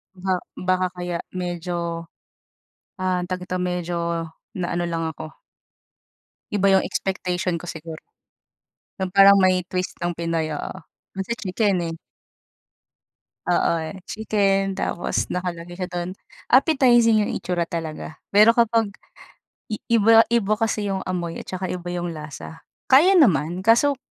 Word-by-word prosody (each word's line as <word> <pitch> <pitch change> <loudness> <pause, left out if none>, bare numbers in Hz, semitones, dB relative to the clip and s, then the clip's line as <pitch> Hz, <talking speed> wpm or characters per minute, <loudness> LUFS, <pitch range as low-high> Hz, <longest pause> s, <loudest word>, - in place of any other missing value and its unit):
Ba 185 +1 -2 0.2
baka 185 0 0
kaya 175 -1 -3 0.2
medyo, 175 -2 -3 1.0
ah, 185 -1 0
tawag 180 0 -4
nito 185 0 -3
medyo, 180 -1 -2 0.6
na 180 -2 -3
ano 175 - 0
lang 165 -1 -2
ako. 155 0 -9 1.2
Iba 200 -1 +2
yung - - +2
expectation 180 -2 -2
ko 170 - -8
siguro. 160 -1 -8 1.0
'Yung 190 -1 -1
parang 200 +1 +8
may 185 -1 +3
twist 185 0 -3
ng 175 0 -2
Pinoy, 165 -2 -2
oo. 145 - -5 0.4
Kasi 195 +4 -3
chicken, 200 -2 0
eh. - - -5 1.5
Oo, 175 - +3
eh. 160 +3 -5
Chicken, 195 -3 +1
tapos 190 -2 -2
nakalagay 175 -1 -4
siya 185 -1 -4
dun. 175 +2 -4 0.3
Appetizing 245 -5 +5
yung - - -3
itsura 175 -2 -2
talaga. 160 -1 -5 0.2
Pero 215 +3 +6
kapag 230 -2 +3 0.8
i 215 - -3
iba-iba 225 -1 +4
kasi 215 -3 0
yung 190 - -2
amoy, 175 -2 -3
at - - -11
saka 185 0 -4
iba 175 -1 -5
yung 175 -1 -3
lasa. 155 +1 -9 0.3
Kaya 335 +9 +7
naman, 180 - +3
kaso 240 +6 +4
180 Hz, 130 wpm, -23 LUFS, 175-205 Hz, 1.5 s, parang